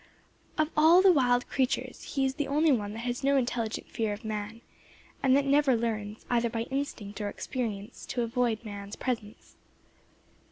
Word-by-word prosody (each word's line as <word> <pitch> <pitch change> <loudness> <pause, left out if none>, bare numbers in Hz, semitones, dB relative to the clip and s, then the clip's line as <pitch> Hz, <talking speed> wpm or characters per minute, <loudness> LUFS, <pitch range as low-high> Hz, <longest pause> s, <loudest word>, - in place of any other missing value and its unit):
Of 310 0 +1
all 330 +4 +7
the 385 - +8
wild 245 -5 +3
creatures 265 +2 -2
he 270 -1 +2
is 265 - 0
the 295 0 -2
only 300 +3 +3
one 210 -5 0
that 225 - -6
has 245 +2 -2
no 275 0 +4
intelligent 240 -3 -1
fear 220 -2 -2
of 205 +2 -9
man, 215 +1 -4 0.6
and 265 0 +5
that 280 - +1
never 280 -2 +4
learns, 220 -2 -3
either 235 -1 +1
by 225 0 -2
instinct 225 -7 -4
or 205 - -1
experience, 220 -2 -5
to 245 - -1
avoid 230 -1 0
man's 200 -1 -7
presence. 225 -4 -5
240 Hz, 170 wpm, -29 LUFS, 215-275 Hz, 0.6 s, the